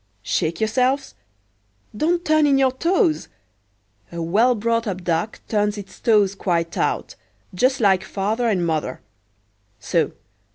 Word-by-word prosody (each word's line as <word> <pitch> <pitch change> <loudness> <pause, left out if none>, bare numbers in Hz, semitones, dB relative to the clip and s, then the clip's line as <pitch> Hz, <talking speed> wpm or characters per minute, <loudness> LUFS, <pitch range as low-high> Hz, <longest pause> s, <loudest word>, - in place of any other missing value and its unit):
Shake 110 - -1
yourselves—don't 210 - -3
turn 310 -1 +4
in 275 -1 +4
your 265 -1 +3
toes; 335 - +1 0.8
a 170 - -6
well 215 +10 +2
brought 230 +1 0
up 185 -2 -4
duck 175 +5 -2
turns 210 -1 0
its 200 -1 -10
toes 210 -5 +3
quite 170 -4 -1
out, - - -1 0.4
just 255 +8 +2
like 190 -4 +3
father 210 +5 -1
and 185 -5 +1
mother,—so! 105 - -4
200 Hz, 120 wpm, -22 LUFS, -, 0.8 s, turn